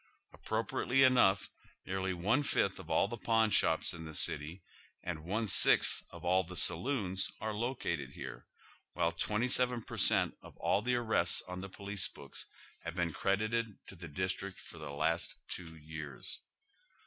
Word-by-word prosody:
Appropriately 115 +4 0
enough, 120 -7 +4 0.4
nearly 95 0 -2
one 100 +10 +1
fifth 100 -8 0
of 80 - -11
all 80 +4 +3
the 120 +3 -6
pawn 110 -1 +2
shops 80 -3 +2
in 80 -1 -8
tlie 80 -1 -8
city 80 +7 +1 0.4
and 80 -3 -4
one 105 +7 -1
sixth 100 - +6
of 85 0 -11
all 90 +2 +4
the 90 0 -9
saloons 95 0 +2
are 110 0 -3
located 105 - -2
here, - - -8 0.5
while 85 - +1
twenty 105 +8 -1
seven 125 -1 +2
per - - -8
cent, - - +3
of - - -14
all 100 - +1
the 125 +2 +1
ari 120 -2 0
ests 85 - +2
on 90 0 -6
the 95 - -7
police 100 0 -3
books 70 -2 -9 0.3
have 85 0 -7
been 85 -3 -1
credited 110 +2 0
to - - -11
the 85 -1 -9
district 95 +4 -3
for - - -13
the - - -7
last 80 +4 -1
two 80 -3 -7
years. 75 -3 -7
95 Hz, 170 wpm, -33 LUFS, 85-110 Hz, 0.5 s, sixth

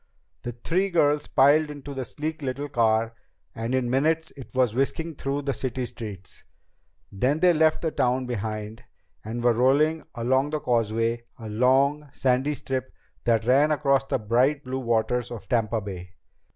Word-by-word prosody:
The 120 - -5
three 180 +11 -1
girls 150 -4 +2
piled 150 +3 +4
into 145 -1 -8
the 130 -2 -4
sleek 155 +6 -5
little 140 +1 -3
car, 115 -3 +2 0.4
and 115 +3 -2
in 130 -2 0
minutes 155 +6 +1
it 135 -3 -10
was 125 -4 +2
whisking 160 +6 -1
through 140 0 -3
the 140 0 -1
city 130 +1 -3
streets. 100 -6 -9 0.7
Then 130 +10 0
they 180 +1 +5
left 155 0 +2
the 160 - 0
town 125 -1 +1
behind 110 -2 -4 0.4
and 115 +2 -5
were 120 -1 +4
rolling 145 +7 +2
along 130 +4 +1
the 155 0 -2
causeway, 115 -1 0
a 115 -3 -8
long, 135 +6 +2
sandy 135 +3 +1
strip 130 -1 -4 0.3
that 115 -2 +2
ran 135 +5 +4
across 140 -2 +2
the - - 0
bright 125 +6 +1
blue 130 +1 -3
waters 120 0 0
of 120 -4 -8
Tampa 115 -2 +1
Bay. 95 -3 -8
130 Hz, 165 wpm, -25 LUFS, 115-145 Hz, 0.7 s, they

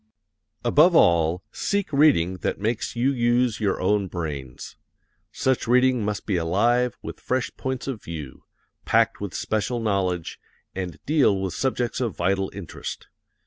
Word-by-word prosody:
Above 170 +4 +5
all, 85 - +4
seek 200 -6 -2
reading 130 - +4
that - - -3
makes 110 +4 -2
you 125 +4 +2
use 120 -1 +1
your 100 -3 0
own 100 +1 +1
brains. 75 -8 -6 0.6
Such 130 -3 0
reading 125 -1 +3
must 105 -2 -3
be 100 -4 0
alive 115 +9 +1
with - - -7
fresh 130 0 -1
points 130 -1 -4
of 125 -6 -4
view, 75 -5 -8 0.4
packed - - +2
with 100 -3 -5
special 110 +3 -1
knowledge, 95 -6 -1 0.3
and 90 -2 -5
deal 140 -10 +3
with 95 -2 -3
subjects 125 -2 -1
of 115 -7 -2
vital 95 +2 0
interest. 95 -6 -8
105 Hz, 145 wpm, -24 LUFS, 90-125 Hz, 0.6 s, Above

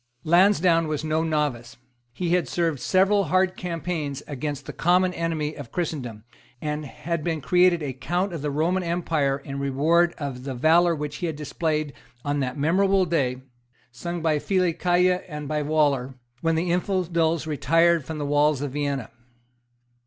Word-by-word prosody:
Lansdowne 175 -1 +4
was 155 -1 -2
no 155 +1 0
novice. 150 -7 -2 0.3
He 170 +9 -3
had 180 0 +2
served 165 -5 -1
several 195 +6 +3
hard 185 +3 +2
campaigns 165 -5 -4
against 145 0 -4
the - - -7
common 180 +2 +2
enemy 160 -3 -2
of 140 -6 -10
Christendom, 130 -11 -4 0.4
and 150 0 -3
had 170 +3 -4
been 165 -1 -1
created 175 +2 +3
a 135 -3 -3
Count 175 +9 -2
of 165 - -5
the 150 - -2
Roman 165 +6 0
Empire 165 -5 0
in 140 0 -7
reward 155 +6 +2
of 135 -4 -5
the 135 -1 -4
valour 165 +6 +4
which 150 -1 -5
he 175 - -2
had 160 - -3
displayed 150 0 -2 0.3
on 145 0 0
that 130 0 -2
memorable 190 +6 +3
day, 130 -6 -1 0.5
sung 170 +7 -5
by 155 -2 +2
Filicaja 180 0 +2
and 150 -2 -6
by 150 0 -1
Waller, 145 -4 +1 0.3
when 165 0 +1
the 170 +2 0
infidels 170 -3 0
retired 165 +3 +2
from 160 +3 -6
the 145 - -3
walls 145 0 +2
of 145 - -3
Vienna. 140 -4 -3
155 Hz, 160 wpm, -24 LUFS, 145-175 Hz, 0.5 s, Lansdowne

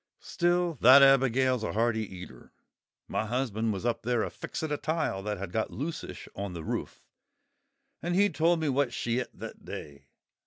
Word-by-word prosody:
Still, 175 -4 0
that 130 +4 +9
Abigail's 130 -2 +4
a - - -2
hearty 110 +1 +1
eater! 90 -1 -11 0.6
My 110 - -2
husband 115 -2 -1
was 100 +2 -4
up 120 - 0
there 120 -1 0
a - - -4
fixing 160 -1 -5
a 150 - 0
tile 155 -10 -1
that 105 +1 -3
had 95 -1 -6
got 110 +3 -1
loosish 155 +4 -6
on 100 -1 -4
the 85 -2 -6
roof, - - -4 1.0
and 175 +1 -1
he 200 +2 +5
told 170 -2 +2
me 160 - -1
what 135 -2 +1
she 120 0 -1
et 125 - -4
that - - -10
day. 70 -2 -9
125 Hz, 180 wpm, -29 LUFS, 110-150 Hz, 1.0 s, that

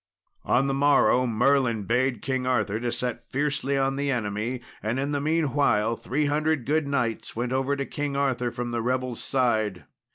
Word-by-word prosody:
On 135 - +3
the 135 - 0
morrow 135 -2 +4
Merlin 120 -1 +2
bade 125 +4 0
King 130 -1 -1
Arthur 110 -4 +1
to 120 0 -2
set 125 0 -3
fiercely 140 0 0
on 135 0 +1
the 140 0 -1
enemy; 115 0 -2 0.2
and 110 +4 -1
in 140 +2 -1
the 145 -1 -1
meanwhile 145 -8 +2
three 145 +6 -1
hundred 150 -2 0
good 155 0 +1
knights 120 -6 -2
went 120 +2 -2
over 135 +2 +1
to 140 0 -3
King 145 0 -3
Arthur 130 -3 0
from 120 0 -4
the 120 -1 -1
rebels' 125 0 -2
side. 110 -8 0
130 Hz, 175 wpm, -26 LUFS, 120-140 Hz, 0.2 s, morrow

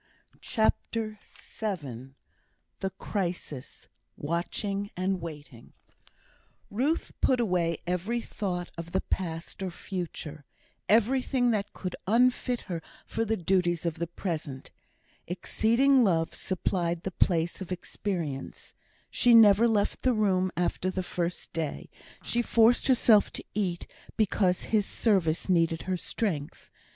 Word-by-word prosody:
CHAPTER 220 -2 0 0.4
VII 135 - -4 0.6
The 190 - -1
Crisis 175 -9 -4 0.3
Watching 195 +6 -2
and 185 0 0
Waiting 150 -7 -9 1.0
Ruth 270 +10 0
put 255 - +3
away 175 -7 +1
every 180 +7 -1
thought 180 -6 -4
of 170 +1 -7
the 190 - +2
past 165 -1 -4
or 190 - -1
future; 170 -5 -6 0.5
everything 245 +3 +3
that 205 -3 -1
could 185 -2 -5
unfit 245 +2 +3
her 170 -4 -5 0.2
for 225 - -1
the 220 0 0
duties 175 -1 +1
of 165 -2 -2
the 170 - -1
present. 160 -6 -5 0.6
Exceeding 235 +9 +3
love 165 -6 +2
supplied 175 -2 -1
the 190 - -3
place 170 0 +1
of 185 - -6
experience. 175 -6 -4 0.4
She 240 -1 +5
never 220 0 +8
left 210 -3 +1
the 255 - +3
room 190 -4 +2
after 180 +1 0
the 185 0 -2
first 175 0 -3
day; 160 -3 -4 0.3
she 240 - +1
forced 230 0 +4
herself 230 -5 +5
to - - -6
eat, 185 -4 -1 0.3
because 190 -4 +2
his 210 -3 +1
service 185 -8 +1
needed 165 -3 +2
her 185 - -1
strength. 165 -6 -3
185 Hz, 120 wpm, -28 LUFS, 170-220 Hz, 1.0 s, never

